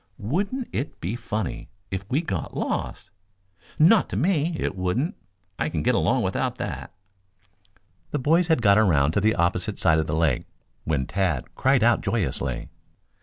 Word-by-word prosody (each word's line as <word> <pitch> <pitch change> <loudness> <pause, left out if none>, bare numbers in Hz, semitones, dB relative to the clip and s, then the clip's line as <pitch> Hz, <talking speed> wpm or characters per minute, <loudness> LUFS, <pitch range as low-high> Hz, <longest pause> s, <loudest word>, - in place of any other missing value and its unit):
Wouldn't 200 - -2
it 140 - -4
be 95 +7 -3
funny 110 -8 -4 0.2
if 95 +1 -4
we 140 +5 +1
got 95 - -4
lost?" - - -3 0.7
"Not 180 +7 +5
to - - -3
me, 170 -2 +1
it - - -2
wouldn't. 95 - -1 0.4
I 80 - 0
can 80 -2 -2
get - - +3
along - - +2
without - - -1
that." - - -5 1.2
The - - -1
boys 160 +6 +3
had 160 -8 +2
got 100 0 +6
around 75 -9 +3
to 100 - +1
the 110 +2 +3
opposite 85 +1 0
side 80 -1 +3
of 80 - -1
the - - -1
lake 80 -6 +1 0.4
when 70 -5 0
Tad 90 -7 -1
cried 130 -3 +2
out 120 -1 +4
joyously. 80 - -2
105 Hz, 165 wpm, -25 LUFS, -, 1.2 s, got